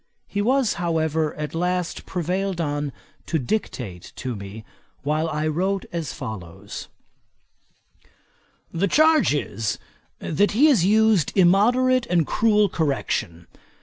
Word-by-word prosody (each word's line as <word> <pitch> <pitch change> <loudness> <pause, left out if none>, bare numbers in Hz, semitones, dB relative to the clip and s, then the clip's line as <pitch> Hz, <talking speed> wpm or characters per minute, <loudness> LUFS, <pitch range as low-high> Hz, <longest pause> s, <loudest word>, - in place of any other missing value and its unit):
He 205 - -2
was, 255 +1 +2
however, 160 -2 0
at 150 -2 -5
last 180 +1 -2
prevailed 185 +1 -2
on 145 -2 -1 0.4
to 165 - 0
dictate 120 - -4
to 125 -2 -4
me, 100 +2 -9 0.4
while 155 +3 0
I 155 0 -2
wrote 190 +5 -1
as 165 -4 -3
follows: 110 - -7 1.9
'The 185 +4 +1
charge 310 - +4
is, 115 -7 -2 0.4
that 205 +7 0
he 255 +8 +5
has 235 - +4
used 215 -2 +3
immoderate 235 +7 +4
and 170 -3 +2
cruel 210 +2 +3
correction. 135 - -2
170 Hz, 115 wpm, -23 LUFS, 145-205 Hz, 1.9 s, he